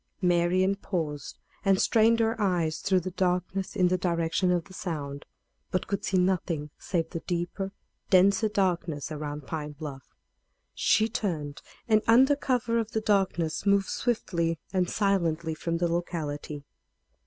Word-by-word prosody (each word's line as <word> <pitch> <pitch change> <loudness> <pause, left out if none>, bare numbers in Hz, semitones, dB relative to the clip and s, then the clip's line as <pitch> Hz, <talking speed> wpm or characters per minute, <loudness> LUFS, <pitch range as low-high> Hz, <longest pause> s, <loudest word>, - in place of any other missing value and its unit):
Marian 180 +2 +3
paused 160 -8 -4 0.3
and 195 -1 +3
strained 230 +1 +4
her 225 0 +2
eyes 170 -5 +1
through 185 -2 +2
the 185 +2 -5
darkness 185 +1 -1
in 180 -1 +3
the 185 0 +1
direction 170 +1 +1
of 175 -2 +1
the 190 - -14
sound, 145 -6 -5 0.4
but 185 - -1
could 200 -1 -3
see 190 - +1
nothing 175 -5 0
save 165 -4 -2
the 165 - -3
deeper, 175 +3 -3 0.4
denser 200 +3 +5
darkness 170 -7 -1
around 150 -1 -5
Pine 150 0 -4
Bluff. 140 -3 -9 0.6
She 220 +1 +3
turned, 160 -10 -3 0.3
and, 215 -2 +4
under 260 +5 +6
cover 245 -4 0
of 225 -1 -3
the 220 - 0
darkness, 190 -6 +1
moved 200 -1 +3
swiftly 170 -8 -1 0.2
and 185 -2 +1
silently 170 -6 +1
from 170 +2 -2
the 175 +1 +1
locality. 155 -4 -3
180 Hz, 145 wpm, -28 LUFS, 160-195 Hz, 0.6 s, under